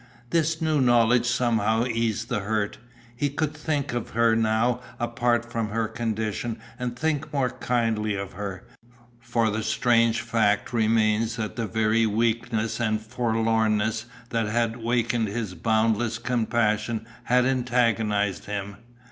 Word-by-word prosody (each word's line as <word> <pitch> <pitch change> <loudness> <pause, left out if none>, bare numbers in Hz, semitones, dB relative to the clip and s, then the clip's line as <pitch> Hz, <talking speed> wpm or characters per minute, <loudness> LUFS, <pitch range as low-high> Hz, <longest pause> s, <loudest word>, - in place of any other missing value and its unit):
This 165 0 +1
new 155 -3 +2
knowledge 120 -1 +4
somehow 115 -2 +2
eased 115 -1 -1
the 125 -3 -1
hurt. 105 0 -2 0.4
He 145 +4 0
could 150 +2 -2
think 150 -3 -2
of 120 -2 -3
her 115 -1 +4
now 115 +2 +2 0.2
apart 120 0 0
from 115 -2 -2
her 110 +1 -1
condition 110 0 -3 0.2
and 125 -1 -3
think 155 0 -1
more 135 -4 0
kindly 115 -4 0
of 100 -1 -5
her, 95 -1 -6 0.6
for 115 -2 0
the 110 +1 -2
strange 115 +1 +2
fact 110 -2 +1
remains 110 0 +2
that 110 -3 -4
the 115 -3 -2
very 110 +1 +2
weakness 115 +1 0
and 110 -2 +1
forlornness 110 -1 0 0.2
that 115 -2 0
had 115 +1 0
wakened 115 -1 0
his 105 -2 -3
boundless 110 +4 +1
compassion 115 -2 0 0.2
had 125 +1 +3
antagonized 115 -6 +1
him. 100 0 -5
115 Hz, 135 wpm, -25 LUFS, 110-120 Hz, 0.6 s, knowledge